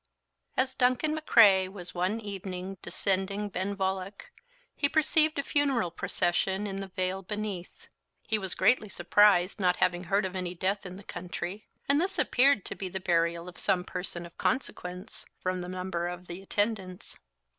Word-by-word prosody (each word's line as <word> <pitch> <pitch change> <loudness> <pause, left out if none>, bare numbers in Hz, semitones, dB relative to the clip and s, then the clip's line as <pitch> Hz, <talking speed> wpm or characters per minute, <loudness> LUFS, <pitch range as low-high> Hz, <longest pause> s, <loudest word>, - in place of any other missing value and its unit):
"As 260 0 +2
Duncan 255 +4 +2
M'Crae 210 -11 +5
was 185 -2 -6
one 185 +5 0
evening 195 -2 -6
descending 195 +3 -1
Benvoilloich, 190 - -3 0.4
he 285 - +2
perceived 310 0 +4
a 280 - 0
funeral 275 - +1
procession 190 +4 0
in 195 -1 -4
the 195 - -5
vale 185 +1 -2
beneath. 205 -2 -6 0.4
He 220 -1 0
was 190 -3 -3
greatly 225 -4 +3
surprised, 185 +1 +4
not 180 -2 +3
having 180 0 +1
heard 195 +3 +1
of 185 0 -4
any 180 -1 -3
death 195 +2 -1
in 180 - -8
the 200 - -11
country; 180 +3 -6 0.2
and 285 +2 +4
this 380 +2 -1
appeared 260 -5 +3
to - - -3
be 190 - -4
the 190 - -3
burial 170 -1 +1
of 180 - -10
some 185 -3 +1
person 180 -1 -3
of 170 - -13
consequence, 180 -8 -3
from 185 0 -2
the 180 - -6
number 180 -1 -3
of 180 0 -6
the 175 +2 -7
attendants. 195 -2 -2
190 Hz, 165 wpm, -29 LUFS, 180-210 Hz, 0.4 s, M'Crae